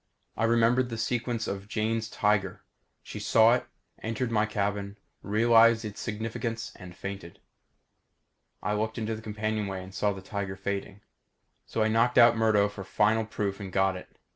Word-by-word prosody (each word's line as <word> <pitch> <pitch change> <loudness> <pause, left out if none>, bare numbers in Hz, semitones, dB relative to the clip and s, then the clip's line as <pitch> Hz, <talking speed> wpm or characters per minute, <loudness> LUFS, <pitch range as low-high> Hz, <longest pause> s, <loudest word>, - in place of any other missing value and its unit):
I 115 - +1
remembered 120 +2 +3
the 115 - -4
sequence 120 0 -1
of 100 0 -5
Jane's 110 +1 -1
tiger. 105 -2 0 0.4
She - - -7
saw 115 +1 +5
it, 125 - -1 0.3
entered 115 +2 -2
my 105 -1 +2
cabin, 100 -1 -2 0.2
realized 115 +1 +4
its 105 -1 -6
significance, 115 +1 -4
and 90 -2 -11
fainted. 95 -3 -7 1.2
I 105 - 0
looked 110 +2 -2
into 110 -1 -2
the 110 - -8
companionway 105 -3 -3
and 95 +1 -12
saw 105 +1 +1
the 95 -1 -7
tiger 100 -1 -4
fading. 100 +1 -4 0.7
So 110 - 0
I - - +2
knocked 115 +3 +2
out 120 -1 +8
Murdo 110 -2 +3
for 100 -1 -8
final 105 +4 +2
proof 100 -2 -3
and 95 -2 -7
got 95 0 +2
it. 90 - -11
110 Hz, 165 wpm, -28 LUFS, 100-115 Hz, 1.2 s, out